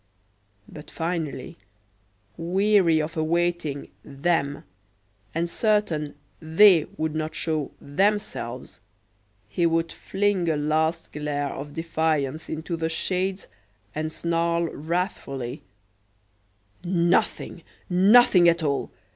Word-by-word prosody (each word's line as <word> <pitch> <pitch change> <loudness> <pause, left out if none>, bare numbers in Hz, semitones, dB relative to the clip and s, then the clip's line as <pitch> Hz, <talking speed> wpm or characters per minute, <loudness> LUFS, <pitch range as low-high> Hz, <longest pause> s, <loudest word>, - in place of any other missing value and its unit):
But, 150 - -11
finally, 160 - -4 0.8
weary 180 -1 +3
of 155 +1 -3
awaiting 165 -2 -1
"them," 140 0 -1 0.7
and 170 +1 0
certain 170 -7 0 0.2
"they" 165 +1 +6
would 160 -1 -1
not 155 0 -3
show 155 -3 -1
"themselves," 145 - -2 0.7
he 170 - +1
would 165 0 0
fling 195 -3 0
a 155 - +1
last 160 +2 0
glare 145 -1 -3
of 145 +1 -7
defiance 160 -3 -1
into 160 +2 -3
the 160 0 -2
shades 185 +3 -1 0.5
and 155 +1 -3
snarl 170 +1 0
wrathfully: 150 - -3 1.2
"Nothing, 175 -1 +1 0.3
nothing 190 -1 +6
at 170 -1 +1
all! 140 -2 -1
165 Hz, 95 wpm, -25 LUFS, 150-175 Hz, 1.2 s, they